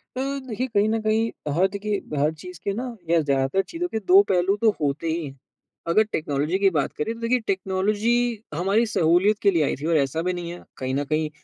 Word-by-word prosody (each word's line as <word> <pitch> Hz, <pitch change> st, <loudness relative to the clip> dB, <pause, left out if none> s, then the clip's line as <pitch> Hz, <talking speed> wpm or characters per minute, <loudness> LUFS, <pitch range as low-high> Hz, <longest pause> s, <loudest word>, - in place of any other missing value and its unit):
अ, -, -, -3 dB
देखिए 260 Hz, -3 st, -3 dB
कहीं 210 Hz, -3 st, +2 dB
न 225 Hz, 0 st, +1 dB
कहीं 220 Hz, +1 st, +1 dB, 0.2 s
अ, -, -, 0 dB
हाँ 175 Hz, +6 st, +3 dB
देखिए 205 Hz, 0 st, -2 dB, 0.2 s
हर 150 Hz, +2 st, +2 dB
चीज़ 180 Hz, +1 st, -11 dB
के 200 Hz, -, -1 dB
ना 240 Hz, +2 st, -4 dB
या 170 Hz, -, +4 dB
ज़्यादातर 140 Hz, +5 st, +1 dB
चीज़ों 350 Hz, +1 st, -3 dB
के 220 Hz, -9 st, -3 dB
2 195 Hz, 0 st, +6 dB
पहलू 185 Hz, +2 st, +2 dB
तो 225 Hz, -, +5 dB
होते 145 Hz, +3 st, -1 dB
ही 165 Hz, 0 st, -1 dB
हैं। 135 Hz, -1 st, -9 dB, 0.5 s
अगर 215 Hz, +6 st, +4 dB
टेक्नोलॉजी 150 Hz, +3 st, -1 dB
की 195 Hz, -, +5 dB
बात 150 Hz, -6 st, -1 dB
करें 185 Hz, +9 st, -2 dB
तो 230 Hz, -, -12 dB
देखिए 250 Hz, +2 st, +2 dB
टेक्नोलॉजी 195 Hz, +4 st, 0 dB, 0.4 s
हमारी 195 Hz, +8 st, +2 dB
सहूलियत 175 Hz, +6 st, +3 dB
के 200 Hz, -, +4 dB
लिए 165 Hz, -4 st, +2 dB
आई -, -, 0 dB
थी 155 Hz, -, -4 dB
और 165 Hz, -1 st, +3 dB
ऐसा 140 Hz, +3 st, 0 dB
भी 180 Hz, +1 st, -1 dB
नहीं 175 Hz, -1 st, -5 dB
है 175 Hz, -, -9 dB
कहीं 130 Hz, 0 st, -3 dB
न 145 Hz, -, 0 dB
कहीं 155 Hz, 0 st, +1 dB
185 Hz, 230 wpm, -24 LUFS, 160-215 Hz, 0.5 s, 2